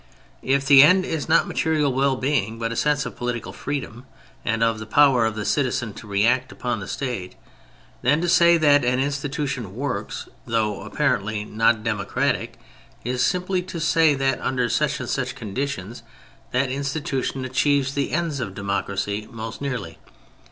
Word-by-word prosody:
If 135 Hz, +1 st, +1 dB
the 140 Hz, -1 st, +8 dB
end 185 Hz, +6 st, +6 dB
is 160 Hz, -1 st, -3 dB
not 165 Hz, -, +4 dB
material 150 Hz, -4 st, +1 dB
well 135 Hz, +1 st, +2 dB
being, 130 Hz, -5 st, -1 dB
but 115 Hz, 0 st, -2 dB
a -, -, -3 dB
sense 150 Hz, +3 st, +1 dB
of -, -, -6 dB
political 120 Hz, -2 st, -4 dB
freedom 135 Hz, -3 st, -5 dB, 0.4 s
and 115 Hz, 0 st, 0 dB
of 115 Hz, -1 st, +1 dB
the 110 Hz, -, -7 dB
power 130 Hz, -3 st, +4 dB
of 110 Hz, -, -3 dB
the 105 Hz, -1 st, -4 dB
citizen 130 Hz, -5 st, 0 dB
to 110 Hz, -, -11 dB
react 120 Hz, +6 st, +1 dB
upon 120 Hz, -3 st, -3 dB
the 95 Hz, -, -7 dB
State, 120 Hz, -9 st, -4 dB, 0.7 s
then 140 Hz, +5 st, +3 dB
to 175 Hz, -, -1 dB
say 170 Hz, 0 st, +6 dB
that 145 Hz, -3 st, +4 dB
an 125 Hz, +1 st, +1 dB
institution 140 Hz, -1 st, -2 dB
'^ -, -, -10 dB
works 130 Hz, +3 st, -4 dB
" -, -, -32 dB
though 110 Hz, -3 st, 0 dB
apparently 105 Hz, +1 st, -1 dB
not 110 Hz, +1 st, +2 dB
democratic, 105 Hz, -3 st, -1 dB, 0.5 s
is 125 Hz, +1 st, -1 dB
simply 180 Hz, 0 st, 0 dB
to 180 Hz, -1 st, -7 dB
say 160 Hz, -1 st, +3 dB
that 135 Hz, 0 st, 0 dB
under 125 Hz, -2 st, 0 dB
such 150 Hz, -3 st, 0 dB
and 130 Hz, -, -5 dB
such 130 Hz, 0 st, -2 dB
conditions 115 Hz, -2 st, -4 dB, 0.5 s
that 130 Hz, +1 st, +1 dB
institution 140 Hz, -1 st, -2 dB
achieves 140 Hz, +1 st, +1 dB
the 140 Hz, -1 st, -1 dB
ends 165 Hz, -3 st, -1 dB
of 100 Hz, -6 st, -4 dB
democracy 100 Hz, +1 st, -2 dB
most 115 Hz, 0 st, -7 dB
nearly. 115 Hz, -, -4 dB
130 Hz, 170 wpm, -23 LUFS, 115-145 Hz, 0.7 s, the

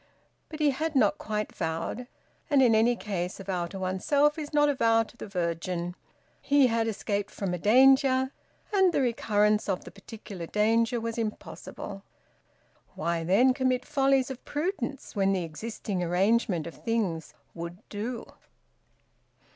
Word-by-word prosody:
But 310 Hz, -, -8 dB
he 300 Hz, -2 st, +4 dB
had 310 Hz, +3 st, -3 dB
not 295 Hz, +3 st, +3 dB
quite 215 Hz, -7 st, -3 dB
vowed. 165 Hz, +10 st, -3 dB, 0.4 s
And, 280 Hz, -3 st, +5 dB
in 235 Hz, -3 st, +5 dB
any 225 Hz, +2 st, +4 dB
case, 185 Hz, -5 st, -4 dB
a -, -, -7 dB
vow 180 Hz, -3 st, -2 dB
to 195 Hz, -, -8 dB
oneself 280 Hz, -, +1 dB
is 300 Hz, -1 st, -6 dB
not 295 Hz, -1 st, +4 dB
a 290 Hz, -, +2 dB
vow 225 Hz, -3 st, +3 dB
to 225 Hz, -, -16 dB
the -, -, -8 dB
Virgin. 175 Hz, -1 st, -2 dB, 0.5 s
He 285 Hz, -1 st, +4 dB
had 230 Hz, -2 st, +1 dB
escaped 205 Hz, -1 st, -2 dB
from 195 Hz, -4 st, -3 dB
a 180 Hz, -, -3 dB
danger, 265 Hz, -, +5 dB, 0.4 s
and 380 Hz, -2 st, +5 dB
the -, -, +2 dB
recurrence 210 Hz, -4 st, +1 dB
of 185 Hz, -, -1 dB
the -, -, -11 dB
particular 195 Hz, -4 st, -9 dB
danger 225 Hz, +4 st, +2 dB
was 230 Hz, 0 st, -4 dB
impossible. 210 Hz, -2 st, -6 dB, 0.9 s
Why 165 Hz, +1 st, -1 dB
then 220 Hz, +10 st, +4 dB
commit 255 Hz, -1 st, 0 dB
follies 270 Hz, -2 st, +2 dB
of 255 Hz, -, -8 dB
prudence, 295 Hz, -6 st, -3 dB
when 195 Hz, -1 st, +2 dB
the 185 Hz, -2 st, 0 dB
existing 190 Hz, +3 st, -4 dB
arrangement 180 Hz, 0 st, +1 dB
of 170 Hz, -, -10 dB
things 205 Hz, -9 st, -1 dB, 0.2 s
`would 170 Hz, +1 st, -6 dB
do'? 225 Hz, +4 st, -4 dB
225 Hz, 155 wpm, -28 LUFS, 190-260 Hz, 0.9 s, And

